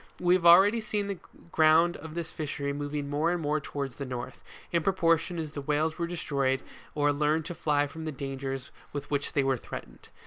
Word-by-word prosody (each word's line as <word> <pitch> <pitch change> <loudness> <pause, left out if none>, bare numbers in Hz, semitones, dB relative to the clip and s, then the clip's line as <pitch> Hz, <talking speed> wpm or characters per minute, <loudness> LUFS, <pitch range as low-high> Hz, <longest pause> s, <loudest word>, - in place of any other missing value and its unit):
We 175 0 +4
have 175 -2 +4
already 200 +7 +7
seen 210 -1 -2
the 200 -3 -4 0.3
ground 160 +2 +5
of 160 +1 -9
this 170 -2 -4
fishery 140 -2 -3
moving 145 0 -3
more 150 +4 +1
and 175 - 0
more 150 -1 0
towards 140 -3 -5
the 140 - -4
north, 125 -1 -6 0.3
in 170 - +2
proportion 170 -1 +2
as 155 -2 -4
the 145 - -5
whales 155 +4 0
were 170 - 0
destroyed 140 -6 -1 0.3
or 145 -1 +3
learned 150 +2 +1
to 175 - -4
fly 150 -3 +1
from 160 +3 -8
the 155 - -2
dangers 135 -1 -5 0.2
with 145 0 -5
which 140 -1 -1
they 140 - +2
were 135 -1 +1
threatened. - - -9
150 Hz, 205 wpm, -29 LUFS, 140-170 Hz, 0.3 s, already